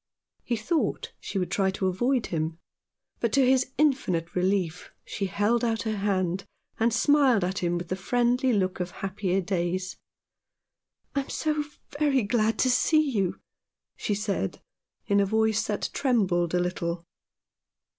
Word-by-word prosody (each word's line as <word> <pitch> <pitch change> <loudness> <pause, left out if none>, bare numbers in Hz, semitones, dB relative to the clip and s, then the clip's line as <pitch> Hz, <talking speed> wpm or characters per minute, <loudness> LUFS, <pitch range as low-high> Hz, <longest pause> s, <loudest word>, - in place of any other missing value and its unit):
He 240 - -1
thought 300 +9 -1
she - - -5
would 180 -2 -1
try 195 -1 +2
to 190 0 -2
avoid 240 +7 +1
him; 160 -1 -2 0.6
but 235 - 0
to 275 -2 +5
his 260 0 +3
infinite 210 - +1
relief 180 -2 0 0.2
she 195 - -3
held 210 +6 +1
out 225 -1 0
her 220 -2 -2
hand, 190 -2 0 0.4
and 230 +1 +3
smiled 260 -3 +4
at 185 +2 -1
him 175 -1 0
with 175 -1 -6
the 185 - 0
friendly 245 +6 +1
look 190 -4 0
of 180 0 -2
happier 195 0 -2
days. 185 0 -2 0.6
" - - -49
I - - +3
am 270 - -5
so 305 -1 0 0.4
very 280 -5 +3
glad 220 +1 +1
to - - +3
see 310 +3 +3
you," 195 -6 -1 0.6
she 205 - -1
said 200 - -2 0.5
in 200 0 +3
a 200 - +4
voice 220 +1 +1
that 210 - -2
trembled 185 - +1
a - - +3
little. 175 -1 -2
205 Hz, 155 wpm, -27 LUFS, 185-245 Hz, 0.6 s, to